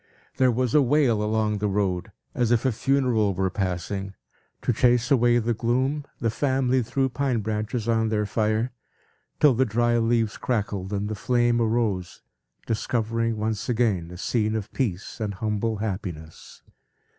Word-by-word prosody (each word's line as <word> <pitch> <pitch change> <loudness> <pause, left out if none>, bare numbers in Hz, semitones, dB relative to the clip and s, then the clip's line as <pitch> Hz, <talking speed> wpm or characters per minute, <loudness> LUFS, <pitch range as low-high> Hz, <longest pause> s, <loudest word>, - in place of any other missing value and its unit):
There 130 -1 +4
was 125 0 0
a 150 - +6
wail, 130 -5 +3
along 105 -1 0
the 105 - 0
road, 95 -3 -1 0.2
as 120 -2 +1
if 120 +1 +2
a 130 - +3
funeral 120 -5 +1
were 95 0 0
passing. 95 +1 -3 0.5
To 125 - +1
chase 120 +2 +2
away 120 -2 +4
the 120 0 +1
gloom, 130 +6 0
the 115 -2 0
family 130 0 +1
threw 130 +3 0
pine 130 -3 -1
branches 110 +2 -3
on 110 -1 +2
their 105 -1 0
fire, 110 +3 0 0.7
till 150 -3 +6
the 125 +3 +3
dry 120 +1 +1
leaves 115 -2 +1
crackled 100 -5 -2
and 100 0 -1
the 110 - -3
flame 120 +2 +1
arose, 110 -5 -1 0.4
discovering 115 0 -1
once 110 +1 -2
again 110 -8 +1
a 90 - -9
scene 110 +3 0
of 110 -2 -4
peace 100 -5 -3
and 105 -3 -3
humble 110 +2 -1
happiness. 90 -7 -6
110 Hz, 155 wpm, -25 LUFS, 105-120 Hz, 0.7 s, a